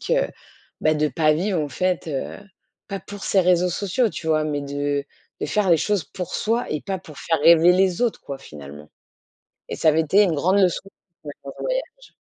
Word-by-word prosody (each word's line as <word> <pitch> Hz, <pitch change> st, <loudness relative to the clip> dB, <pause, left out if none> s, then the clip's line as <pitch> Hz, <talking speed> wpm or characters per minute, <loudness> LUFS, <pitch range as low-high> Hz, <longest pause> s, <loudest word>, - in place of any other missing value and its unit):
que, -, -, +1 dB, 0.5 s
bah, 155 Hz, 0 st, +3 dB
de 150 Hz, 0 st, +1 dB
pas 155 Hz, +3 st, +2 dB
vivre 180 Hz, +2 st, 0 dB
en 145 Hz, -, -2 dB
fait, 180 Hz, +3 st, -1 dB
heu, 135 Hz, -3 st, -4 dB, 0.5 s
pas 195 Hz, -, -4 dB
pour 205 Hz, +1 st, -9 dB
ces 195 Hz, -, +3 dB
réseaux 180 Hz, 0 st, +3 dB
sociaux, 210 Hz, +6 st, 0 dB
tu 160 Hz, -, -7 dB
vois, 155 Hz, -1 st, +2 dB
mais 145 Hz, -2 st, -2 dB
de 145 Hz, 0 st, -2 dB, 0.4 s
de -, -, -1 dB
faire 205 Hz, -4 st, +1 dB
les 170 Hz, -, +7 dB
choses 205 Hz, +2 st, 0 dB
pour 180 Hz, -1 st, -7 dB
soi 230 Hz, +3 st, 0 dB
et 155 Hz, -, -2 dB
pas 190 Hz, -1 st, -3 dB
pour 155 Hz, -5 st, -13 dB
faire 165 Hz, -, 0 dB
rêver 170 Hz, +2 st, +7 dB
les 185 Hz, 0 st, +2 dB
autres 240 Hz, -3 st, 0 dB
quoi, 140 Hz, -, -7 dB
finalement, 75 Hz, -, -11 dB, 0.8 s
et -, -, -3 dB
ça -, -, +1 dB
avait 155 Hz, +1 st, +3 dB
été 190 Hz, +7 st, +4 dB
une 175 Hz, -5 st, +1 dB
grande 185 Hz, +7 st, +2 dB
leçon 180 Hz, -3 st, +2 dB, 0.4 s
pendant 140 Hz, -2 st, -9 dB
ce -, -, -8 dB
voyage. -, -, -4 dB
170 Hz, 205 wpm, -23 LUFS, 150-195 Hz, 0.8 s, les